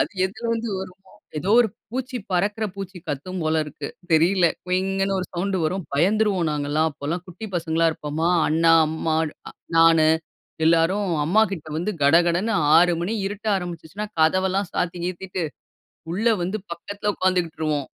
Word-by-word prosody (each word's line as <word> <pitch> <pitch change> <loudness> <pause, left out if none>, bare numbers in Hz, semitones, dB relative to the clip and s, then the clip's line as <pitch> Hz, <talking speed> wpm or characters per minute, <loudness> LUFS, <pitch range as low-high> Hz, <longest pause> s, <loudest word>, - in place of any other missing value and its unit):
அது - - +1 0.2
எதில 195 +5 -11
வந்து 230 0 -3
வருமோ 190 0 -11 0.3
ஏதோ 185 +7 -2
ஒரு 235 - +3 0.2
பூச்சி, 255 +1 -4
பறக்கிற 205 +4 0
பூச்சி 195 -2 -7
கத்தும் 175 +6 -4
போல 155 0 +2
இருக்கு. 150 - -7 0.2
தெரியலை. 170 +2 +4 0.2
குயிங்ன்னு 195 +1 0
ஒரு 180 - -4
சவுண்ட் 190 +2 -1
வரும். 180 +2 -1
பயந்துருவோம் 190 +2 +2
நாங்க 145 -1 -2
எல்லாம். 155 +2 +2
அப்போ 145 0 -9
எல்லாம் 175 +3 -2
குட்டி 185 +4 -8
பசங்களா 165 -1 +1
இருப்போமா? 155 +2 -2 0.2
அண்ணா, 165 +2 +4 0.2
அம்மா, 160 0 -1 0.6
நானு 165 -1 +6 0.6
எல்லாரும் 170 +5 +3 0.2
அம்மா 195 +8 +4
கிட்ட 160 -5 -6
வந்து, 195 +5 -2
கடகடன்னு 170 +8 +3 0.2
6:00 175 +1 +5
மணி 185 +6 -2
இருட்ட 205 +2 -4
ஆரம்பிச்சுச்சுன்னா, 180 +3 -6
கதவெல்லாம் 185 +4 +2
சாத்தி 175 0 -1
கீத்திட்டு, 185 0 -4 0.7
உள்ளே 225 +4 +2
வந்து 190 +5 -2
பக்கத்தில 205 +4 -3
உக்காந்துகிட்ருவோம். 165 -5 0
180 Hz, 145 wpm, -23 LUFS, 160-195 Hz, 0.7 s, நானு